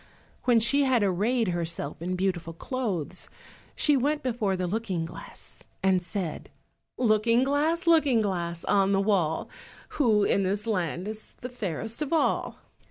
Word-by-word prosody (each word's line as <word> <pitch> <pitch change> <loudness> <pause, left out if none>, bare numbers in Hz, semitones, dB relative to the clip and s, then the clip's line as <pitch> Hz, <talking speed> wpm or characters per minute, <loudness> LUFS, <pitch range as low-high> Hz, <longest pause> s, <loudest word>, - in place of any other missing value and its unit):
When 240 -2 +5
she 280 +5 +3
had 250 -5 +3
arrayed 210 +4 +1
herself 165 -4 -3
in 180 +2 -2
beautiful 180 -3 -2
clothes 185 - -3 0.5
she 295 - +3
went 290 +3 0
before 225 -6 0
the 180 - -1
Looking 185 -3 -2
glass, - - -12 0.2
and 190 -1 +3
said— 175 -2 -5 0.5
"Looking 230 +1 +3
glass, 305 +6 +1
Looking 305 -8 +4
glass, 170 -5 -2
on 200 -1 +3
the 195 - +3
wall, 190 -6 +1 0.5
Who 220 -7 +4
in 200 - +2
this 200 +3 -1
land 180 -4 -1
is 215 0 -7
the 250 - -7
fairest 225 - -4
of 295 - -2
all?" 325 - +1
210 Hz, 150 wpm, -27 LUFS, 180-250 Hz, 0.5 s, When